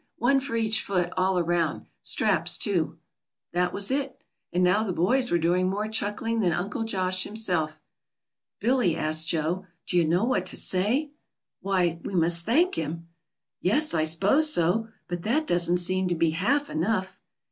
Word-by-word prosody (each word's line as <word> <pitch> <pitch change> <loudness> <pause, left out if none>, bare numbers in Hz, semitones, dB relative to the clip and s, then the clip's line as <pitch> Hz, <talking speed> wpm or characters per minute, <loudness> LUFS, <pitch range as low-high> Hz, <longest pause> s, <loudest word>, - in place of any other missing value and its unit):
"One 270 +4 +3
for 270 -3 -4
each 220 -2 +1
foot, 180 -2 -1
all 185 0 +1
around. 170 -2 0 0.2
Straps - - +1
too." - - 0 0.6
That 180 0 +1
was 200 +5 -1
it, 275 -1 -2 0.3
and 180 +1 +1
now 180 +4 +3
the 215 -4 -2
boys 245 +10 +2
were 175 - +2
doing 175 +2 +1
more 205 +3 -2
chuckling 220 +1 -1
than 185 -5 +2
Uncle 195 +7 -2
Josh 185 -3 0
himself. 175 -8 -1 0.8
"Billy," 240 -9 +2
asked 155 +1 -1
Joe, 170 +4 -1 0.2
"do 180 - -1
you 170 - +4
know 175 +5 +2
what 255 +2 0
to - - -1
say?" 235 +11 0 0.5
"Why, 180 -4 0
we 195 - -5
must 170 +1 +2
thank 330 +11 +3
him." 165 +2 -5 0.5
"Yes, 295 - +2
I 155 -1 +1
s'pose 200 - +3
so. 180 - +1 0.2
But 175 -1 -4
that 275 - 0
doesn't 175 - +2
seem 185 +1 0
to 175 - 0
be 165 -1 +2
half 275 - 0
enough." 190 +3 -1
185 Hz, 170 wpm, -26 LUFS, 170-225 Hz, 0.8 s, you